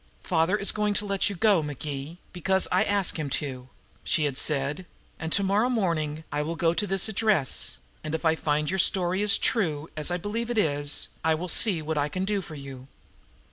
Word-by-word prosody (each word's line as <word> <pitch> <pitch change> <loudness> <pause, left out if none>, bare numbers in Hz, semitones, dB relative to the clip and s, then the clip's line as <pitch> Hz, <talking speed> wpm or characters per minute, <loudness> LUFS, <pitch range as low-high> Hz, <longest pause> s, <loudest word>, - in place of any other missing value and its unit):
"Father 170 +3 +1
is 200 - +4
going 210 -1 -1
to 210 - 0
let 200 -1 +1
you 200 - -5
go, 200 -2 +3
McGee, 145 +1 -6 0.2
because 190 +2 +1
I 185 - +3
ask 200 -4 0
him 150 -2 -3
to," 130 -3 -7 0.3
she 155 - +1
had 145 -3 -1
said. 145 +5 0 0.3
"And 160 0 -5
to 200 - +4
morrow 205 +5 +1
morning 165 -9 -1
I 145 - -1
will 160 +3 -3
go 165 0 +1
to 205 +4 -1
this 195 0 +2
address, 210 - +1 0.3
and 155 +1 -3
if 160 - -5
I 160 - +4
find 150 0 -1
your 190 - -1
story 185 +1 +2
is 210 -1 +5
true, 160 - 0
as 155 +1 0
I 175 - -1
believe 220 +6 -4
it 240 - -2
is, 145 -6 +1 0.2
I 160 0 +2
will 175 +3 -5
see 175 -1 +4
what 155 0 -2
I 145 +1 0
can 185 +5 -3
do 200 0 -1
for 160 -4 -10
you." 135 -2 -10
170 Hz, 215 wpm, -26 LUFS, 150-200 Hz, 0.3 s, is